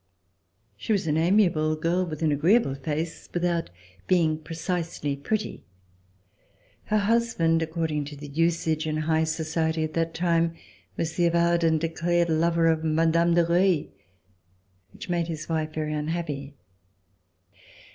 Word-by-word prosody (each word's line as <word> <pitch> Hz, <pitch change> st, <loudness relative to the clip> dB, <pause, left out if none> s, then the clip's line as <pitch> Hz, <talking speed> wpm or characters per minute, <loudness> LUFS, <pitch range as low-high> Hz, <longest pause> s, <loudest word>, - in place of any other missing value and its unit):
She 220 Hz, -, -1 dB
was 200 Hz, -, 0 dB
an 150 Hz, -2 st, 0 dB
amiable 165 Hz, -3 st, +3 dB
girl 170 Hz, +4 st, 0 dB
with 155 Hz, -1 st, -5 dB
an 155 Hz, -, +3 dB
agreeable 160 Hz, -, +3 dB
face, 155 Hz, +4 st, -4 dB
without 175 Hz, -1 st, 0 dB, 0.4 s
being 160 Hz, -4 st, +2 dB
precisely 165 Hz, -2 st, -3 dB
pretty. 205 Hz, +10 st, -3 dB, 1.2 s
Her 215 Hz, -, +1 dB
husband, 205 Hz, -7 st, +2 dB
according 160 Hz, -2 st, -2 dB
to 145 Hz, +1 st, -8 dB
the 145 Hz, +1 st, -9 dB
usage 160 Hz, 0 st, 0 dB
in 155 Hz, 0 st, -1 dB
high 160 Hz, +1 st, +1 dB
society 160 Hz, 0 st, -1 dB
at 155 Hz, -, -4 dB
that 165 Hz, 0 st, -1 dB
time, 170 Hz, -1 st, +1 dB, 0.4 s
was 160 Hz, -1 st, -3 dB
the 175 Hz, -1 st, +3 dB
avowed 170 Hz, 0 st, +2 dB
and 160 Hz, -1 st, +3 dB
declared 170 Hz, +1 st, 0 dB
lover 165 Hz, +1 st, +2 dB
of 160 Hz, -1 st, +2 dB
Mme. 160 Hz, +1 st, +1 dB, 0.3 s
de 170 Hz, -1 st, +4 dB
Reuilly, 175 Hz, -1 st, +2 dB, 1.0 s
which -, -, -10 dB
made 170 Hz, -2 st, -1 dB
his 155 Hz, -2 st, -5 dB
wife 155 Hz, -1 st, -1 dB
very 155 Hz, -1 st, -2 dB
unhappy. 150 Hz, -2 st, -4 dB
165 Hz, 135 wpm, -26 LUFS, 155-170 Hz, 1.2 s, de